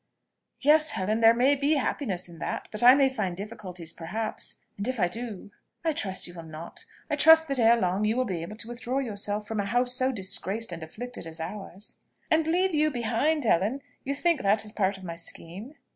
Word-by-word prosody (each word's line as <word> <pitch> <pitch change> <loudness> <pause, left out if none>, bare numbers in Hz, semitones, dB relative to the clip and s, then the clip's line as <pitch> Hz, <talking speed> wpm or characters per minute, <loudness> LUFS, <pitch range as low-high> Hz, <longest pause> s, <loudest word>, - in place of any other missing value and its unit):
"Yes, 305 +2 +5
Helen, 210 +1 -1
there 225 0 +8
may 255 +4 +4
be 285 +3 +2
happiness 220 -9 -1
in 170 -2 -13
that; - - -4
but 215 - -3
I 250 +2 +9
may 275 -1 +5
find 205 -9 -2
difficulties, 185 -5 -7
perhaps: 215 +7 -4 0.2
and 200 +3 -4
if 255 -2 -2
I 180 - +4
do! 215 0 -6 0.2
" - - -34
"I 325 - +3
trust 190 -10 -2
you 175 - -6
will 170 - -8
not. 160 +1 -9 0.2
I - - 0
trust 320 0 +7
that 275 -2 0
ere 230 0 +5
long 185 +1 0
you 215 +3 +1
will 255 - +2
be 180 -7 -3
able 195 +6 -7
to 225 - -6
withdraw 240 +2 -3
yourself 210 -4 -2
from 220 -1 -3
a 200 - 0
house 245 +4 +1
so 255 +1 +1
disgraced 205 0 0
and 170 -1 -6
afflicted 220 +5 -7
as 165 0 -8
ours!" 195 +3 -7 0.3
"And 320 0 +3
leave 360 +3 +2
you 305 0 +3
behind, 260 +4 0
Helen? 220 +6 +1 0.2
You 280 +1 -2
think 335 -1 +1
that 205 +2 +3
is 210 - -3
part 195 -2 0
of 190 - -13
my 170 -2 -5
scheme?" 185 - -7
220 Hz, 220 wpm, -27 LUFS, 190-265 Hz, 0.3 s, I